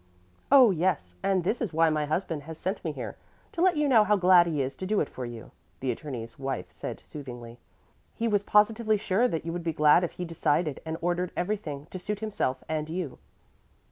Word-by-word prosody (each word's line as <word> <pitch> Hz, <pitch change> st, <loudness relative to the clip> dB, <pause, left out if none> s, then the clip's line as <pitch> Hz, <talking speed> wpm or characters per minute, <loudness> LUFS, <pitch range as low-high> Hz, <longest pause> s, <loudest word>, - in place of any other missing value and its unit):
"Oh, 260 Hz, -6 st, +8 dB
yes, 165 Hz, -, 0 dB
and 190 Hz, -2 st, +1 dB
this 215 Hz, +7 st, -1 dB
is 225 Hz, -8 st, -2 dB
why 165 Hz, 0 st, +4 dB
my 150 Hz, -1 st, 0 dB
husband 155 Hz, -1 st, -2 dB
has 160 Hz, -, -6 dB
sent 190 Hz, +5 st, -3 dB
me -, -, -1 dB
here, -, -, -6 dB, 0.3 s
to 335 Hz, -, -3 dB
let 360 Hz, -3 st, +4 dB
you 295 Hz, -1 st, +2 dB
know 235 Hz, -6 st, +6 dB
how 210 Hz, 0 st, +3 dB
glad 180 Hz, -2 st, +6 dB
he 155 Hz, -3 st, -1 dB
is 135 Hz, 0 st, -2 dB
to 185 Hz, -, -5 dB
do 210 Hz, +1 st, +2 dB
it 150 Hz, -, +1 dB
for 125 Hz, -2 st, -6 dB
you," 115 Hz, -2 st, -9 dB, 0.3 s
the 130 Hz, -1 st, -1 dB
attorney's 120 Hz, -3 st, -7 dB
wife 135 Hz, -1 st, -4 dB
said -, -, -7 dB
soothingly. 120 Hz, -5 st, -9 dB, 0.6 s
"He 230 Hz, -, -1 dB
was 205 Hz, -3 st, +2 dB
positively 215 Hz, +1 st, +3 dB
sure 210 Hz, +3 st, +2 dB
that 165 Hz, -7 st, -3 dB
you 165 Hz, -, -3 dB
would 175 Hz, -, -3 dB
be 165 Hz, -1 st, -1 dB
glad 150 Hz, +3 st, +5 dB
if 175 Hz, -, -2 dB
he 180 Hz, -, -5 dB
decided 160 Hz, -2 st, 0 dB
and 160 Hz, 0 st, -3 dB
ordered 175 Hz, +1 st, 0 dB
everything 175 Hz, -7 st, -3 dB
to 185 Hz, -, -5 dB
suit 210 Hz, +3 st, -3 dB
himself 205 Hz, -12 st, -2 dB
and 155 Hz, -1 st, -2 dB
you." 165 Hz, -, -4 dB
170 Hz, 215 wpm, -28 LUFS, 150-205 Hz, 0.6 s, Oh